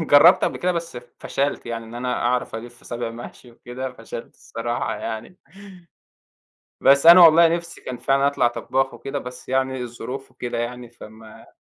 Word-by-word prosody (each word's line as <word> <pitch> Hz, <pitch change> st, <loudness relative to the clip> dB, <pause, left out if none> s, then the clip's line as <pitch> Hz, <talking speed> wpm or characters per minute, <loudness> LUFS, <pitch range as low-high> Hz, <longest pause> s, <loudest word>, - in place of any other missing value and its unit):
جربت 165 Hz, +3 st, +6 dB
قبل -, -, -1 dB
كده 180 Hz, 0 st, 0 dB
بس 165 Hz, -5 st, -5 dB, 0.2 s
فشَلت 140 Hz, -2 st, -2 dB
يعني 115 Hz, -1 st, -5 dB
إن 115 Hz, -, -12 dB
أنا 125 Hz, +1 st, -2 dB
أعرف 125 Hz, -2 st, -1 dB
ألِفّ 120 Hz, +1 st, -9 dB
صابع 120 Hz, -1 st, -4 dB
محشي 120 Hz, +1 st, -11 dB
وكده، 125 Hz, +2 st, -7 dB
فشلت 115 Hz, -1 st, -9 dB
الصراحة 120 Hz, +1 st, -4 dB
يعني. 115 Hz, +10 st, -6 dB, 1.4 s
بس 140 Hz, +3 st, +5 dB
أنا 175 Hz, +2 st, +10 dB
والله 165 Hz, 0 st, +8 dB
نِفسي 170 Hz, +1 st, -4 dB
كان 130 Hz, -, -6 dB
فعلًا 135 Hz, +1 st, +2 dB
أطْلع 125 Hz, -4 st, +2 dB
طبّاخ 135 Hz, +2 st, -2 dB
وكده، 135 Hz, +4 st, -5 dB
بس 125 Hz, -1 st, -10 dB
يعني 130 Hz, 0 st, 0 dB
الظروف 125 Hz, +3 st, -7 dB
وكده 120 Hz, -1 st, -5 dB
يعني، 120 Hz, 0 st, -5 dB
فما 110 Hz, -1 st, -14 dB
125 Hz, 160 wpm, -22 LUFS, 120-140 Hz, 1.4 s, أنا